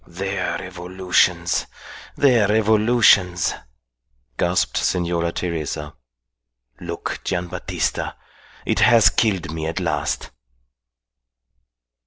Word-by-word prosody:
"Their 95 Hz, +2 st, -3 dB
revolutions, 90 Hz, 0 st, 0 dB, 0.5 s
their 120 Hz, -7 st, +4 dB
revolutions," 105 Hz, -4 st, +3 dB, 0.8 s
gasped 90 Hz, +6 st, 0 dB
Senora 85 Hz, -1 st, 0 dB
Teresa. 80 Hz, -4 st, -4 dB, 0.9 s
"Look, 85 Hz, -1 st, -5 dB
Gian' 90 Hz, -1 st, -2 dB
Battista, -, -, -3 dB, 0.5 s
it -, -, 0 dB
has 115 Hz, -3 st, +6 dB
killed 95 Hz, -8 st, 0 dB
me 80 Hz, -1 st, -4 dB
at 80 Hz, -, -3 dB
last!" 75 Hz, -5 st, -2 dB
90 Hz, 80 wpm, -21 LUFS, 85-100 Hz, 0.9 s, has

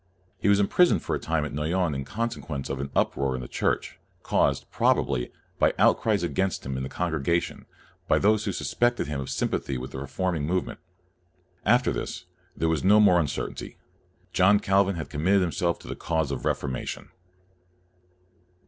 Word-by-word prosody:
He 100 Hz, -, +1 dB
was 100 Hz, 0 st, +5 dB
imprisoned 175 Hz, -, +3 dB
for -, -, -1 dB
a -, -, -3 dB
time 80 Hz, -2 st, -1 dB
at 75 Hz, -, -6 dB
Noyon 80 Hz, +3 st, 0 dB
in 70 Hz, -1 st, -4 dB
consequence 100 Hz, -, -4 dB
of 70 Hz, -, -3 dB
an 70 Hz, 0 st, -4 dB
uproar 70 Hz, -1 st, +1 dB
in 65 Hz, -, -4 dB
the -, -, -7 dB
Church, -, -, -2 dB, 0.2 s
caused, -, -, +1 dB
probably, 60 Hz, -3 st, +1 dB, 0.3 s
by -, -, +3 dB
outcries 105 Hz, -5 st, +3 dB
against 95 Hz, +2 st, -1 dB
him 65 Hz, 0 st, -3 dB
in 65 Hz, -, -3 dB
the 65 Hz, -, -4 dB
congregation, 85 Hz, -1 st, -1 dB, 0.4 s
by -, -, +4 dB
those 110 Hz, +1 st, +3 dB
who -, -, 0 dB
sus -, -, -4 dB
pected 120 Hz, 0 st, +2 dB
him 70 Hz, -1 st, -3 dB
of 65 Hz, -, -6 dB
sympathy 70 Hz, -, -1 dB
with 65 Hz, +1 st, -6 dB
the 65 Hz, -, -6 dB
reform 85 Hz, +6 st, -2 dB
ing 75 Hz, -1 st, -2 dB
movement. 90 Hz, +2 st, -2 dB, 0.9 s
After -, -, +4 dB
this, -, -, -5 dB, 0.3 s
there 80 Hz, -, +1 dB
was 80 Hz, -1 st, 0 dB
no 105 Hz, +3 st, +6 dB
more 95 Hz, -4 st, +6 dB
uncertainty. 75 Hz, -5 st, -4 dB, 0.6 s
John 95 Hz, +3 st, +5 dB
Calvin 100 Hz, -1 st, +2 dB
had 80 Hz, -5 st, -6 dB
com 75 Hz, +1 st, -4 dB
mitted 95 Hz, +2 st, +4 dB
himself 85 Hz, 0 st, 0 dB
to -, -, -14 dB
the -, -, -5 dB
cause 80 Hz, -4 st, -1 dB
of 70 Hz, -, -3 dB
the -, -, +1 dB
Refor 70 Hz, -, -2 dB
mation. 65 Hz, -, -5 dB
85 Hz, 185 wpm, -26 LUFS, 70-95 Hz, 0.9 s, no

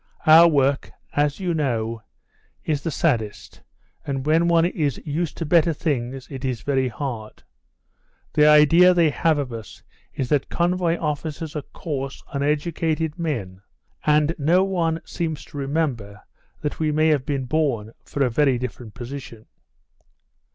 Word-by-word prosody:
Our 160 Hz, +2 st, +9 dB
work, 140 Hz, -3 st, +1 dB, 0.3 s
as 145 Hz, +2 st, +1 dB
you 180 Hz, -3 st, -1 dB
know, 115 Hz, -7 st, -1 dB, 0.6 s
is 150 Hz, -2 st, -1 dB
the 165 Hz, -, -2 dB
saddest, 120 Hz, -10 st, -2 dB, 0.4 s
and 135 Hz, -1 st, -3 dB
when 160 Hz, +3 st, +3 dB
one 170 Hz, -1 st, +4 dB
is 155 Hz, -6 st, -1 dB
used 160 Hz, +2 st, -2 dB
to 165 Hz, -, -3 dB
better 165 Hz, +1 st, +3 dB
things 135 Hz, -4 st, -3 dB
it 135 Hz, -1 st, -7 dB
is 125 Hz, -4 st, -3 dB
very 135 Hz, -2 st, +1 dB
hard. 115 Hz, -2 st, -6 dB, 0.9 s
The 150 Hz, 0 st, +5 dB
idea 165 Hz, +4 st, +6 dB
they 165 Hz, -3 st, +4 dB
have 160 Hz, +1 st, +1 dB
of 135 Hz, -4 st, -3 dB
us 115 Hz, -2 st, -9 dB, 0.3 s
is 130 Hz, -2 st, -2 dB
that 145 Hz, -3 st, +1 dB
convoy 175 Hz, -1 st, +1 dB
officers 155 Hz, 0 st, -4 dB
are 150 Hz, -, -2 dB
coarse, 135 Hz, -5 st, -5 dB
uneducated 155 Hz, +2 st, -1 dB
men, 110 Hz, -, -3 dB, 0.4 s
and 150 Hz, +1 st, +3 dB
no 170 Hz, +6 st, +3 dB
one 170 Hz, -4 st, 0 dB
seems 160 Hz, -3 st, -4 dB
to -, -, -11 dB
remember 135 Hz, -8 st, -2 dB, 0.4 s
that 150 Hz, -, -3 dB
we 155 Hz, -1 st, +1 dB
may 155 Hz, +1 st, +3 dB
have 145 Hz, -4 st, +2 dB
been 140 Hz, -2 st, -2 dB
born 125 Hz, -6 st, -1 dB
for 140 Hz, -, -2 dB
a -, -, +1 dB
very 135 Hz, 0 st, +3 dB
different 120 Hz, -3 st, -7 dB
position." 120 Hz, -3 st, -8 dB
150 Hz, 150 wpm, -23 LUFS, 130-160 Hz, 0.9 s, Our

